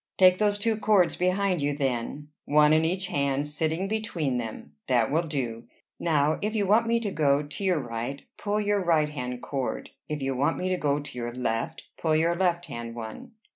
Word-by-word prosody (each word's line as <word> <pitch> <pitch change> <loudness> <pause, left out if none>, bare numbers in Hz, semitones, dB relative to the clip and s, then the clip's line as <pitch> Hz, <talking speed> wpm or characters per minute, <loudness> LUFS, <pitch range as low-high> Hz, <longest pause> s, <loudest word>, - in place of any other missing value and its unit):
"Take 185 -1 +6
those 205 -1 +2
two 220 +1 0
cords 205 -4 +3
behind 185 -1 +1
you, 145 0 0
then, 135 +2 -2 0.2
one 150 +1 +5
in 160 +1 +4
each 185 +4 0
hand, 140 -3 0
sitting 160 +5 -1
between 180 - -1
them. 110 -10 -7
That 120 -2 +2
will 165 +3 +1
do. 120 -6 -3 0.3
Now, 155 -2 +2
if 215 +2 -1
you 205 -2 +2
want 220 +4 +4
me 235 0 +3
to 210 -3 -2
go 145 -3 +2
to 145 +5 -7
your 185 -3 +2
right, 120 +2 -5
pull 210 +1 -1
your 205 -1 +1
right 160 -3 +3
hand 125 -4 -5
cord; 135 -3 -3 0.2
if 150 -1 -2
you 135 -1 -1
want 145 +5 +1
me 185 - -1
to 185 - +1
go 145 -3 +1
to 145 -4 -9
your 120 0 -4
left, 115 -3 -2 0.2
pull 160 -2 +2
your 165 +2 +2
left 175 -1 +1
hand 115 0 -6
one." 115 - -8
150 Hz, 205 wpm, -27 LUFS, 135-185 Hz, 0.3 s, Take